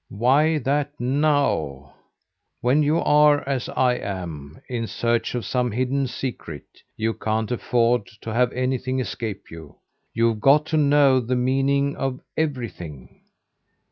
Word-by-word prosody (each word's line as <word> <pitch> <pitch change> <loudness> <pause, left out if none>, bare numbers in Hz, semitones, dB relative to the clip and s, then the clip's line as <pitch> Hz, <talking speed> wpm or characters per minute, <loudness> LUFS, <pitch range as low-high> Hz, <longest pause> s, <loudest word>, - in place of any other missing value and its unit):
"Why 140 +9 +2
that 145 +1 -1
'now'? 125 - 0 0.7
When 130 +5 +3
you 150 +2 +2
are, 150 -2 +4
as 135 -3 -2
I 125 -1 +1
am, 80 -8 -6
in 115 -3 -3
search 115 +2 -1
of 120 - -3
some 125 -1 0
hidden 130 +4 -1
secret, 120 - -6 0.3
you 110 +1 0
can't 110 0 -2
afford 120 -2 +1 0.2
to 110 - -4
have 125 +1 +2
anything 130 0 -1
escape 110 -5 -5
you. 80 -3 -11 0.4
You've 115 -1 +1
got 145 +4 +5
to - - +4
know 140 -3 +4
the 125 +1 -2
meaning 135 +3 +1
of 135 -1 -2 0.2
everything. 110 - -5
125 Hz, 135 wpm, -23 LUFS, 110-140 Hz, 0.7 s, got